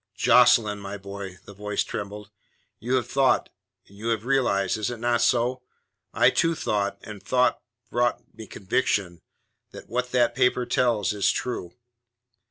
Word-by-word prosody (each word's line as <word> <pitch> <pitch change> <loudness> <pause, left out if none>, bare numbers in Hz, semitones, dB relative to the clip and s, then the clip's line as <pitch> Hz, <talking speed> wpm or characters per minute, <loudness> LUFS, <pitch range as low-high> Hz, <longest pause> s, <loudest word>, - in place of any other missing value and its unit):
"Jocelyn, 115 -2 +4
my 100 0 -6
boy," 100 -2 -8
the 100 - -11
voice 105 +1 -2
trembled. 105 +1 -7 0.5
"You 125 +4 -1
have 125 - 0
thought, 135 -1 +2 0.4
and 100 - -19
you 110 +3 -6
have 115 -1 -1
realized 115 -7 +1
is 110 - -1
it 120 - -5
not 120 +1 0
so? 125 +1 +1 0.5
I - - +4
too 165 0 +1
thought, 100 -8 -1
and 105 -2 -9
thought 125 0 +1 0.3
brought 120 0 +1 0.2
me 110 - -10
conviction 95 -4 -1 0.5
that - - -12
what 125 +2 -2
that 125 -1 +2
paper 125 -1 +2
tells 120 -5 +1
is 100 -1 +1
true." 105 -9 -4
110 Hz, 155 wpm, -25 LUFS, 100-125 Hz, 0.5 s, Jocelyn